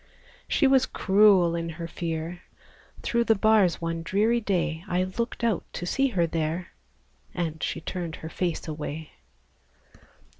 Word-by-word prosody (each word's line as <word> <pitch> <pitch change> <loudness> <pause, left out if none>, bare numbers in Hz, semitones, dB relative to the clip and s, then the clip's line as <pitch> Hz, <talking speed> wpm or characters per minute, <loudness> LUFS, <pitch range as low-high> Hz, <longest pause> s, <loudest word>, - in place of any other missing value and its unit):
She 290 - +2
was 265 -1 +4
cruel 195 -4 +4
in 170 0 -2
her 165 +1 -6
fear; 165 +1 -4 0.6
Through 235 0 +1
the 225 - +4
bars 210 -4 +4
one 165 0 -3
dreary 210 +8 +2
day, 175 -5 -1
I 180 0 +1
looked 230 +6 -4
out 225 -7 +1
to 175 - -4
see 270 +9 +2
her 185 -9 +1
there, 165 +2 -2 0.7
And 160 -3 -3
she - - -2
turned 170 -3 -4
her 160 - -8
face 175 -1 -2
away! 155 0 -5
175 Hz, 145 wpm, -26 LUFS, 165-210 Hz, 0.7 s, was